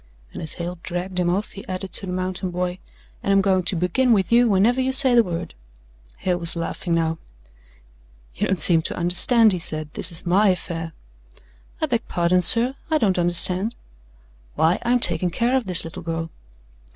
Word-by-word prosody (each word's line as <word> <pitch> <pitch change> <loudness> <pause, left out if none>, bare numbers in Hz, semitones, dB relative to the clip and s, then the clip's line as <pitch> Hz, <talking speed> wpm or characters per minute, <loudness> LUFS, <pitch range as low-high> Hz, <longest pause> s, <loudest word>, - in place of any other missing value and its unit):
And - - -8
as 160 - -5
Hale 175 0 -7
dragged 180 +1 -5
him 175 -1 0
off 195 +4 -2
he 195 - -10
added 185 +1 -6
to 195 - -5
the - - -5
mountain 185 +1 -4
boy, 180 +1 -4 0.4
"and 200 - -2
I'm 195 - +4
going 190 -1 +1
to 180 +1 -1
begin 205 +9 +1
with 195 -1 0
you 240 0 +4
whenever 220 +6 +2
you 260 0 -1
say 265 -1 +6
the 240 - +6
word." 175 -4 -6 0.6
Hale 180 -1 -2
was 170 0 +8
laughing 170 +1 -3
now. 165 -1 -1 1.1
"You - - -2
don't 190 -2 -1
seem 165 +1 +5
to - - -5
understand," 205 +6 +2
he 180 - -3
said, 155 -2 -6
"this 185 - -1
is 165 - +1
my 195 +5 +2
affair." 165 -3 -3 0.9
"I - - +2
beg - - -1
your - - -29
pardon, 175 +1 +1
sir, 235 +8 +4 0.2
I 315 - +2
don't 195 -9 0
understand." 180 +5 +2 0.8
"Why, 165 +3 +1
I'm 245 +1 +1
taking 175 -4 -1
care 235 +8 -1
of 255 -6 -1
this 180 -2 +4
little 165 - -9
girl." 165 -1 -5
180 Hz, 195 wpm, -21 LUFS, 170-205 Hz, 1.1 s, was